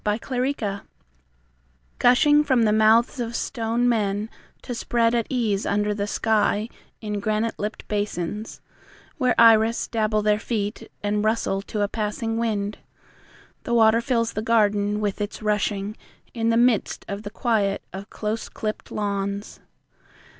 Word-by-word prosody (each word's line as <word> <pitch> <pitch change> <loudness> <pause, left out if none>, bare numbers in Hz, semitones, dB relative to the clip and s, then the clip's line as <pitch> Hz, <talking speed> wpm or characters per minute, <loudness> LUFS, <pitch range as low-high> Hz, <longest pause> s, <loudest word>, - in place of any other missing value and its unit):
In 210 - +1
a - - -2 0.4
Garden 200 -6 -4 1.2
Gushing 295 +5 +5
from 260 -5 +2
the 210 -1 +3
mouths 220 +4 +4
of 235 -1 -3
stone 235 0 -1
men 210 -2 0 0.3
To 245 - -5
spread 230 0 +1
at 235 -2 0
ease 220 -6 0
under 210 +1 0
the 205 0 -3
sky 215 0 +1 0.3
In 210 -2 -3
granite 215 +2 0
lipped 210 +2 -5
basins, 205 0 -3 0.6
Where 250 -2 +2
iris 230 0 +5
dabble 215 -2 0
their 210 0 +2
feet 210 -2 -3
And 205 0 0
rustle 215 -3 0
to 205 +1 -3
a - - +1
passing 220 +2 -3
wind, 210 -3 -2 0.8
The 235 - -1
water 225 0 +5
fills 230 -1 0
the 215 - -2
garden 210 -2 +2
with 205 0 -2
its 205 +1 -5
rushing, 210 -1 -1 0.4
In 230 -1 0
the 230 - +3
midst 240 -3 +2
of 200 +1 -5
the 205 - -6
quiet 205 -3 0
of 195 +2 -8
close 215 +1 -4
clipped 215 -1 -5
lawns. 200 0 -3
215 Hz, 145 wpm, -24 LUFS, 205-230 Hz, 1.2 s, Gushing